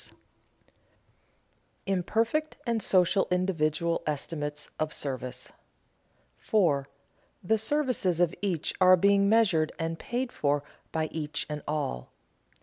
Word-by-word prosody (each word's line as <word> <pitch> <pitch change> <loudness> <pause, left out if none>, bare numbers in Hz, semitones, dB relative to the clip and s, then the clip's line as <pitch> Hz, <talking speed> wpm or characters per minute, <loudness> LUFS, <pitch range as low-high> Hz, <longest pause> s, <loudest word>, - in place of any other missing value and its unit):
[Sidenote: - - -7 1.7
Imperfect 225 - 0 0.2
social 190 -1 +3
and - - +1
individual 170 -2 0
estimates 150 0 -3
of 155 0 -1
service] 130 -3 -4 0.9
4. 155 -10 +1 0.6
_The 220 +4 +2
services 240 - 0
of 175 -1 +3
each 180 -6 -1
are 185 0 +8
being 200 +2 +4
measured 195 -9 +3
and 165 0 -3
paid 245 +1 -3
for 145 - 0 0.3
by 160 -1 0
each 155 -1 -3
and 150 0 -4
all. 145 - -2
170 Hz, 110 wpm, -28 LUFS, 150-200 Hz, 1.7 s, are